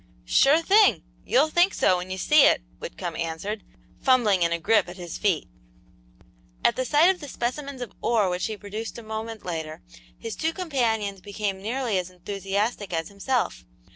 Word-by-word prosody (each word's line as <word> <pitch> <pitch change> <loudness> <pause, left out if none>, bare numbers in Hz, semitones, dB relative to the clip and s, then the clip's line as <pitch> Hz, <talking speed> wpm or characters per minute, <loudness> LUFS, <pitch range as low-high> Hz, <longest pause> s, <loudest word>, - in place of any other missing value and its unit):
"Sure 285 - +4
thing! 405 +3 +5 0.2
You'll 290 +5 +4
think 350 +4 +3
so 185 - +3
when 180 +1 -6
you 185 - -4
see 300 +8 +5
it," - - +3 0.2
Whitcomb - - -6
answered, 170 +6 -4 0.4
fumbling 235 -8 +3
in 170 0 +2
a 170 - +1
grip 190 +2 +2
at 180 - -9
his 175 -2 -7
feet. 185 -7 +1 1.2
At 260 - +3
sight 320 +6 +5
of 365 - -15
the 290 - -7
specimens 265 +1 -4
of 230 - -10
ore 220 -4 +2
which 180 0 -1
he 215 -1 -5
produced 215 +3 -6
a 235 - -9
moment 220 0 -6
later, 160 -3 -5 0.3
his 225 - -6
two 320 +1 -1
companions 225 - -1
became 200 -1 -4
nearly 230 -1 -1
as 180 0 -5
enthusiastic 195 +3 -3
as 165 -1 -2
himself. 230 +5 -2
215 Hz, 170 wpm, -25 LUFS, 185-260 Hz, 1.2 s, thing